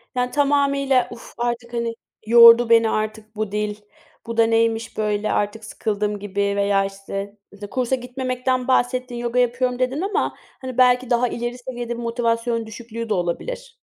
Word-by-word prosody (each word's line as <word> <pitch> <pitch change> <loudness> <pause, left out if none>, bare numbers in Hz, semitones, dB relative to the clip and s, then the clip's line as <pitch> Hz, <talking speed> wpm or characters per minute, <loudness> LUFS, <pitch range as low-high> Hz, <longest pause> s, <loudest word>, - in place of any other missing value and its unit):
Yani, 250 0 0
tamamıyla 280 -2 +2
"Uf 235 - -11
artık, 240 0 -3
hani, 235 -1 -2 0.3
yordu 235 +1 +8
beni 230 -1 +5
artık 215 0 -3
bu 215 -1 -3
dil, 210 0 -2 0.5
bu 230 0 -5
da 230 - +6
neymiş 225 0 0
böyle, 210 0 0
artık 210 +2 -1
sıkıldım." 210 -1 -2
gibi 200 0 -5 0.2
veya, 200 -1 +2
işte, 195 +1 -6
mesela, 205 0 -10
kursa 255 +2 0
gitmemekten 255 0 -2
bahsettin, 250 -1 +1
yoga 240 +1 -1
yapıyorum 250 +1 +1
dedin, 255 +4 0
ama, 395 +2 -1 0.3
hani, 255 -2 -6
belki 250 0 +4
daha 245 0 +2
ileri 240 +1 -4
seviyede 245 -1 -5
bir 240 - -6
motivasyon 230 0 -1
düşüklüğü 230 +1 -7
de - - +2
olabilir. 470 - -3
235 Hz, 160 wpm, -22 LUFS, 215-250 Hz, 0.5 s, yordu